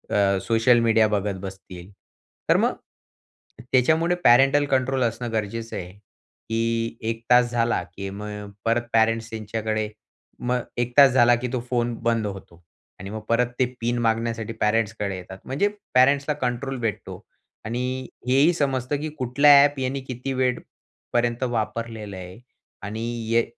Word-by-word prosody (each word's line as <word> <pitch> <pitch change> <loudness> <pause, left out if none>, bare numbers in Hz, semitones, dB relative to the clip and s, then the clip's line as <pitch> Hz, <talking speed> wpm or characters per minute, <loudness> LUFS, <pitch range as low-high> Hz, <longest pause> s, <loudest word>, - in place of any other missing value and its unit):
अ, 100 -1 +3
social 115 +1 +4
media 115 -1 +4
बघत 100 -1 -3
बसतील. 95 -1 -10 0.6
तर - - +5
मग, - - +1 1.0
त्याच्यामुळे 160 +7 +3
पॅरेंटल 135 +4 +5
कंट्रोल 135 -1 0
असणं 115 0 -2
गरजेचं 115 +1 -3
आहे. 90 -1 -6 0.6
की 115 0 -1
1 115 0 -3
तास 125 -1 +5
झाला 120 -2 +1
की 100 0 -5
मग 105 0 -7
परत 115 +1 +2
पेरेंट्स 115 0 +2
त्यांच्याकडे, 110 0 -3 0.5
मग 125 0 -1 0.2
1 120 0 -1
तास 140 -2 +8
झाला 120 -1 +5
की 125 - -2
तो 125 - 0
फोन 120 -1 0
बंद 115 -2 +1
होतो. 90 -3 -10 0.4
आणि 95 +1 -7
मग 110 +1 -6
परत 120 +1 +3
ते 130 - +4 0.2
पिन 120 +1 0
मागण्यासाठी 115 0 -1
पॅरेंट्सकडे 105 -2 0
येतात. 95 +1 -10
म्हणजे 140 +10 0 0.3
पॅरेंट्सला 140 +3 +4
कंट्रोल 130 +2 -2
भेटतो 115 -5 -4 0.4
आणि 125 +3 -3 0.2
हेही 140 +7 +4
समजतं 140 -3 -1
की 155 - -3
कुठल्या 140 +4 +5
ॲप 145 -1 +1
याने 130 +1 -2
किती 130 +1 -4
वेळपर्यंत 120 -1 -2
वापरलेलं 115 -3 -3
आहे 90 +2 -9 0.4
आणि 110 +2 -5 0.3
य 115 - +4
115 Hz, 145 wpm, -24 LUFS, 110-130 Hz, 1.0 s, तास